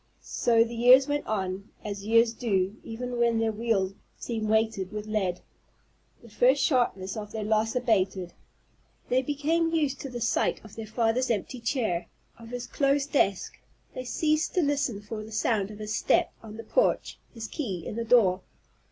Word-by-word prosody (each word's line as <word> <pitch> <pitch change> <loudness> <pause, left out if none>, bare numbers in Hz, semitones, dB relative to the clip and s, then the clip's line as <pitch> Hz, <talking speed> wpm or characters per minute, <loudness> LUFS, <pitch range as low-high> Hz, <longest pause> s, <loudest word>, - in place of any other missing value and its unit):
So 230 -2 +3
the 235 +1 -6
years 250 +3 +6
went 290 0 -2
on, 195 -1 -3 0.2
as 205 -1 -5
years 230 0 +4
do 195 -4 0
even 245 +2 -5
when 235 -1 +3
their 225 0 +1
wheels 210 -4 0 0.2
seem 225 -2 -3
weighted 220 -3 +1
with 210 0 -5
lead. 195 -5 -1 0.8
The 235 - -14
first 260 +5 +3
sharpness 205 -8 +1
of 210 -1 -6
their 220 -1 -4
loss 220 +2 +1
abated. 190 -7 0 0.8
They 255 +1 +3
became 305 +4 0
used 295 -4 0
to 275 - -5
the 245 -1 -5
sight 235 0 +1
of 215 - -13
their 225 -1 -6
father's 230 +3 +1
empty 230 +3 -2
chair, 230 -8 -1 0.3
of 230 0 -11
his 245 0 -5
closed 280 0 +1
desk; 200 -9 +1 0.3
they 255 - -5
ceased 310 +4 0
to 360 - +3
listen 280 -7 0
for 215 +1 -6
the 220 - -11
sound 215 -2 0
of 210 - -9
his 215 0 -4
step - - +2
on 220 -1 -10
the 225 - -7
porch, - - +1 0.2
his 225 -1 -5
key 195 - -4
in - - -5
the 230 - -2
door. 220 -6 +4
225 Hz, 180 wpm, -27 LUFS, 210-250 Hz, 0.8 s, years